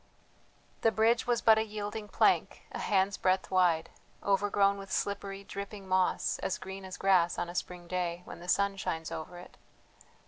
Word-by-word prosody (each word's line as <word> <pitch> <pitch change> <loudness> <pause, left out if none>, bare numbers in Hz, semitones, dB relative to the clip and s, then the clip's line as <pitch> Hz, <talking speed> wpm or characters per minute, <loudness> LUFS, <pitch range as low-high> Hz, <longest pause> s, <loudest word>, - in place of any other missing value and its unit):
The 225 - +4
bridge 225 +2 +2
was 240 -1 +1
but 220 -1 +6
a - - +2
yielding 210 0 -5
plank, - - +2
a - - -5
hand's 195 -1 +1
breadth 185 +1 +1
wide, 175 -3 +2 0.3
overgrown 200 0 +2
with 195 -1 -9
slippery, 200 0 -2
dripping 200 0 -7
moss 185 0 +1
as 190 - -2
green 190 0 -8
as 185 -1 -7
grass 180 -3 +3
on 175 - -2
a - - -7
spring 180 -1 -5
day 180 -1 -2
when - - -9
the 175 - -10
sun 200 +2 +2
shines 160 -4 -3
over 160 +3 -6
it. 175 - -13
195 Hz, 175 wpm, -31 LUFS, 180-205 Hz, 0.3 s, but